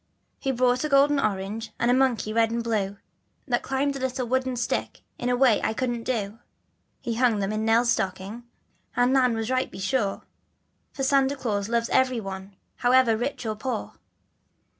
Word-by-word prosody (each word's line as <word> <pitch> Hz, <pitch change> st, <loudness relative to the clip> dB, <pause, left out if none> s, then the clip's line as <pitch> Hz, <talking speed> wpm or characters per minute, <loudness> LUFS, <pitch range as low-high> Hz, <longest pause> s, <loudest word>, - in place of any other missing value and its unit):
He 270 Hz, -, -1 dB
brought 250 Hz, +1 st, +2 dB
a 305 Hz, -, -1 dB
golden 280 Hz, +1 st, +4 dB
orange, 210 Hz, 0 st, -2 dB
and 240 Hz, +1 st, +3 dB
a -, -, +5 dB
monkey 255 Hz, -4 st, +1 dB
red 225 Hz, 0 st, +3 dB
and 235 Hz, +1 st, -2 dB
blue, 205 Hz, -4 st, -1 dB, 0.5 s
That 240 Hz, -2 st, +1 dB
climbed 275 Hz, +1 st, -1 dB
a -, -, -4 dB
little 255 Hz, -1 st, -2 dB
wooden 260 Hz, +1 st, 0 dB
stick 240 Hz, 0 st, -2 dB, 0.2 s
in 245 Hz, -, -1 dB
a 250 Hz, -, +2 dB
way 245 Hz, -4 st, +4 dB
I 220 Hz, -, -1 dB
couldn't 240 Hz, -2 st, -2 dB
do. 220 Hz, -3 st, -2 dB, 0.6 s
He 235 Hz, -, -2 dB
hung 235 Hz, -1 st, +2 dB
them 195 Hz, 0 st, -1 dB
in 215 Hz, +1 st, -1 dB
Nell's 230 Hz, +2 st, +4 dB
stocking, 195 Hz, +4 st, -2 dB, 0.5 s
and 245 Hz, +1 st, +3 dB
Nan 250 Hz, -3 st, +3 dB
was 225 Hz, +2 st, -2 dB
right, 255 Hz, 0 st, +1 dB
be -, -, -11 dB
sure, 195 Hz, +1 st, -1 dB, 0.7 s
That 270 Hz, -, -3 dB
Santa 275 Hz, 0 st, +3 dB
Glaus 210 Hz, -6 st, -2 dB
loves 235 Hz, 0 st, +1 dB
every 255 Hz, -2 st, +2 dB
one 195 Hz, -1 st, -7 dB, 0.2 s
however 245 Hz, -2 st, +4 dB
rich 240 Hz, +2 st, -3 dB
or 215 Hz, -1 st, -2 dB
poor. 230 Hz, 0 st, -4 dB
240 Hz, 180 wpm, -25 LUFS, 220-260 Hz, 0.7 s, a